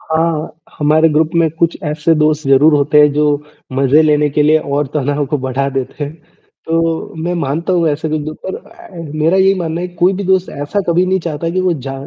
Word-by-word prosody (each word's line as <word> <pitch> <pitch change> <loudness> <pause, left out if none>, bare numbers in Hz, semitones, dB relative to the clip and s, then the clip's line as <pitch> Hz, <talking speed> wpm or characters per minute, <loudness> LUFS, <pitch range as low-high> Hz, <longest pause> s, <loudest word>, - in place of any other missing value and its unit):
हाँ, 160 0 -1 0.3
हमारे 155 +2 +3
ग्रुप 155 +1 +1
में 165 -1 +3
कुछ 170 -1 +1
ऐसे 150 +2 +1
दोस्त 150 -1 +1
ज़रूर 140 +4 +5
होते 145 +1 +3
हैं, 150 -1 +5
जो 150 0 +1 0.3
मज़े 135 +3 +3
लेने 150 -1 +2
के 150 +1 +1
लिए 155 +1 +4
और 145 -1 -2
तनाव 145 0 0
को 150 +2 -2
बढ़ा 130 +1 -2
देते 135 +2 -4
हैं। 145 - -7 0.5
तो 165 0 -1
मैं 175 +2 -1
मानता 165 +3 -2
हूँ, 170 -3 +2
ऐसे 155 +2 -2
कुछ 155 0 -1
लोग 155 +1 -6
पर 190 - -4
अ, 175 -3 -12
मेरा 155 +4 +2
यही 190 0 +4
मानना 165 -1 -3
है 180 - -4
कोई 180 +2 +3
भी 195 +1 -4
दोस्त 190 0 +1
ऐसा 200 +8 -1
कभी 170 +2 +3
नहीं 190 +1 +1
चाहता 165 0 -3
कि 185 +2 -1
वो 185 -1 +1
जा 135 - -4
155 Hz, 220 wpm, -15 LUFS, 145-170 Hz, 0.5 s, ज़रूर